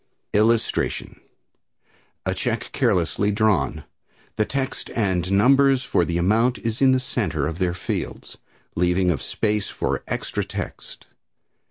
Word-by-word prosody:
[Illustration: 110 +2 +1 1.0
A - - 0
Check - - -2
Carelessly 90 +4 +1
Drawn. 100 -8 +1 0.5
The 110 - +1
text 135 +2 -3
and 95 -5 0
numbers 135 +6 +4
for 90 -9 +1
the 85 0 -1
amount 115 +8 +2
is 115 +1 -3
in 135 -1 +6
the 130 - +3
center 105 - -1
of 80 +3 -4
their 90 -2 0
fields, 90 - -5 0.4
leaving 90 +1 +2
of 75 - -2
space 105 -2 -1
for - - -2
extra - - -2
text. - - -7
105 Hz, 130 wpm, -23 LUFS, 90-115 Hz, 1.0 s, in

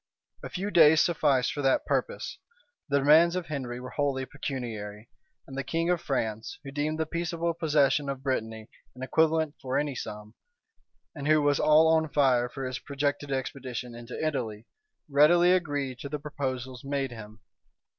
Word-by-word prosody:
A - - -7
few 200 +3 -4
days 160 -3 +7
sufficed 145 -7 +2
for 145 - -3
that 135 -1 +2
purpose: - - -2 0.5
the 140 - +3
demands 155 +5 +5
of 180 -2 -2
Henry 130 -6 -5
were 125 0 -8
wholly 140 -2 -1
pecuniary; 115 -7 -6 0.4
and 135 - -10
the 135 - -2
king 165 +4 0
of 175 - 0
Franco, 110 -5 -1 0.2
who 135 - -8
deemed 150 +2 -2
the 160 - +1
peaceable 170 +1 -2
possession 145 -3 +2
of 135 -1 -5
Brittany 110 -5 -3 0.3
an 130 - -8
equivalent 160 +2 +1
for 130 -1 -1
any 145 -1 -1
sum, 105 -3 -7 0.8
and 145 -3 -5
who 155 0 +5
was 145 -1 +2
all 155 +1 +5
on 160 -1 +3
fire 130 -4 +2
for 135 +1 -6
his 130 0 -4
projected 145 0 -2
expedition 130 -2 -4
into 120 +1 -8
Italy, 115 -8 -3 0.4
readily 160 +5 +5
agreed 145 -8 -1
to 140 - -6
the 150 - -3
proposals 130 -4 -5
made 140 -2 -2
him. 110 -1 -10
140 Hz, 165 wpm, -28 LUFS, 125-155 Hz, 0.8 s, days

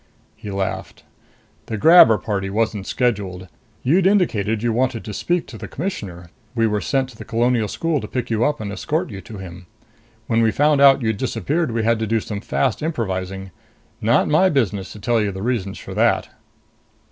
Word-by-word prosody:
He 105 - -9
laughed. 95 -1 -4 0.6
"The 110 - -3
grabber 160 - +7
party 95 -1 -3
wasn't 105 -1 -1
scheduled. 100 -7 -1 0.4
You'd 175 +8 +3
indicated 115 - +1
you 120 -1 +1
wanted 125 -1 0
to 105 - -6
speak 175 - -1
to 110 - -11
the - - -7
Commissioner. 95 - -6 0.2
We 115 -1 +2
were 105 -2 0
sent 135 -2 0
to 125 - -14
the - - -8
Colonial 120 -1 +1
School 165 +5 -1
to 105 - -6
pick 125 0 -4
you 110 +1 +1
up 150 +3 +1
and 100 -2 -5
escort 155 - -2
you 100 -2 -7
to 110 -1 -10
him. 90 -1 -10 0.6
When 115 0 +1
we 115 - +4
found 145 +5 +3
out 135 -2 +6
you'd 110 -2 0
disappeared, 130 - -1
we 115 -1 -1
had 115 0 +2
to 110 - -2
do 115 +1 +1
some 105 -1 -6
fast 125 +1 -1
improvising. 95 - -3 0.5
Not 115 +1 +3
my 155 +5 +4
business 105 - -1
to 105 - -11
tell 115 +1 +1
you 105 -1 0
the 95 +1 -6
reasons 110 -6 -2
for - - -9
that." - - +2
115 Hz, 195 wpm, -21 LUFS, 100-130 Hz, 0.6 s, grabber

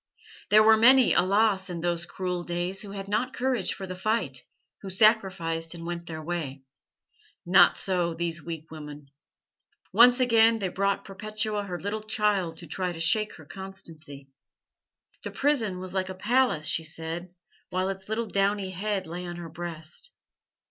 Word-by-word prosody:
There 215 +1 +7
were 220 0 +6
many, 255 +2 +6
alas! 195 0 +2
in 170 -2 -5
those 170 0 -1
cruel 180 -1 -3
days 175 +2 -2
who 205 - -8
had 195 0 -6
not 225 +6 -1
courage 255 0 0
for 195 - -6
the 185 -1 -6
fight, 185 - -1 0.4
who 195 - -7
sacrificed, 185 -5 +2
and 165 0 -8
went 170 0 -5
their 160 -1 -6
way. 155 -5 -4 0.8
Not 175 0 +6
so 175 -3 0
these 170 -1 -2
weak 165 -2 -7
women. 150 -3 -10 0.8
"Once 245 +4 +7
again 230 -2 +5
they 195 -4 -2
brought 200 +2 -1
Perpetua 215 +1 -3
her 180 -2 -5
little 205 +2 -3
child 210 -6 0
to 170 - -8
try 180 +1 -3
to 165 - -8
shake 210 +6 +1
her 160 - -14
constancy. 155 -7 -9 0.9
'The - - -5
prison 245 -10 +1
was 185 0 -5
like 190 -1 -1
a 185 - -6
palace,' 220 -5 +1
she 160 +2 0
said, 165 +2 -6 0.3
while 185 +1 -1
its 195 +1 -7
little 225 +2 -1
downy 200 -1 0
head 195 +1 -2
lay 175 +2 -6
on 175 - -6
her 170 -1 -8
breast. 170 - -8
185 Hz, 165 wpm, -27 LUFS, 170-210 Hz, 0.9 s, There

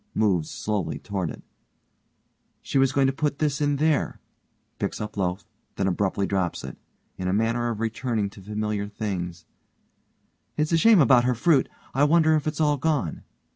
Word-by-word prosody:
Moves 95 -8 +1
slowly 100 -7 -2
toward 95 -5 -3
it_) - - -9 1.2
She 135 - 0
was 135 -1 +4
going 135 0 +2
to 135 - +2
put 145 +1 -1
this 150 -1 0
in 145 -1 +2
there, 155 +1 +1 0.6
(picks - - -2
up 105 0 -5
loaf, 90 -2 -2 0.3
then 95 - -1
abruptly 95 +1 0
drops 95 -3 -1
it. - - -7 0.4
In 90 - -2
a 90 - +1
manner 115 +3 +1
of 115 -3 -4
returning 115 -1 -1
to 100 - -13
familiar 105 0 -3
things) 90 -5 -4 1.1
It's 150 +1 0
a 165 - +4
shame 215 +1 +6
about 125 -2 +5
her 125 0 +2
fruit. 140 +3 +3 0.2
I 135 - +2
wonder 160 0 +4
if 155 0 -1
it's 155 - -2
all 150 -2 +3
gone. 140 - -1
115 Hz, 175 wpm, -25 LUFS, 100-145 Hz, 1.2 s, shame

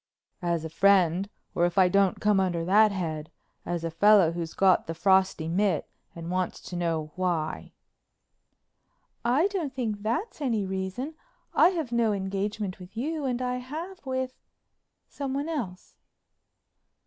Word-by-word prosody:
"As 170 -2 -1
a - - -4
friend, 190 +1 +3 0.2
or 175 - +3
if 175 +2 -6
I 185 -1 +7
don't 195 0 +2
come 210 -2 +3
under 175 -3 0
that 210 +4 +5
head, 160 -5 -3 0.4
as 175 -1 -2
a 165 - -2
fellow 195 0 +5
who's 170 -1 -5
got 190 -1 +4
the 165 - -4
frosty 190 -2 +2
mit 195 +4 +1 0.3
and 170 0 -6
wants 185 -1 -1
to 180 - -8
know 165 -3 -1
why." 175 -4 -2 1.5
"I 255 +8 +3
don't 335 -10 -3
think 220 -5 -2
that's 300 - -2
any 230 -7 0
reason. 190 +10 -4 0.4
I - - +6
have 325 -9 -3
no 235 -3 +2
engagement 195 0 -3
with 185 +4 -12
you 300 +4 -2
and 250 -1 -1
I 250 0 -1
have 315 +9 -7
with—someone 265 +2 -6
else." 220 - -5
195 Hz, 145 wpm, -27 LUFS, 175-250 Hz, 1.5 s, I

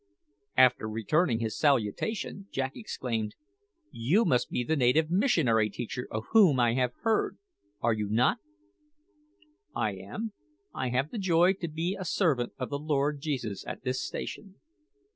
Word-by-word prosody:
After 125 -4 +5
returning 115 - +1
his 110 -1 -2
salutation, 145 - 0
Jack 135 0 -1
exclaimed, 115 - -4 0.6
"You 160 - +2
must 125 -9 +2
be 125 - -1
the 160 +7 0
native 155 +4 +3
missionary 145 - +3
teacher 120 +3 -5
of 110 0 -3
whom 190 - +6
I 120 -1 +3
have 125 -1 0
heard 225 -2 +1 0.4
are 115 0 +3
you 105 -2 -2
not?" 120 - +2 1.4
"I - - 0
am. 220 -1 -6 0.4
I 130 - -2
have 130 +5 0
the 230 - -4
joy 180 -1 +4
to 180 -3 -5
be 165 +4 -2
a - - -3
servant 155 -9 +1
of 130 - -4
the 140 - -2
Lord 145 -1 0
Jesus 130 -10 -3
at - - -6
this 130 0 -1
station." 195 -2 -6
135 Hz, 150 wpm, -29 LUFS, 120-175 Hz, 1.4 s, whom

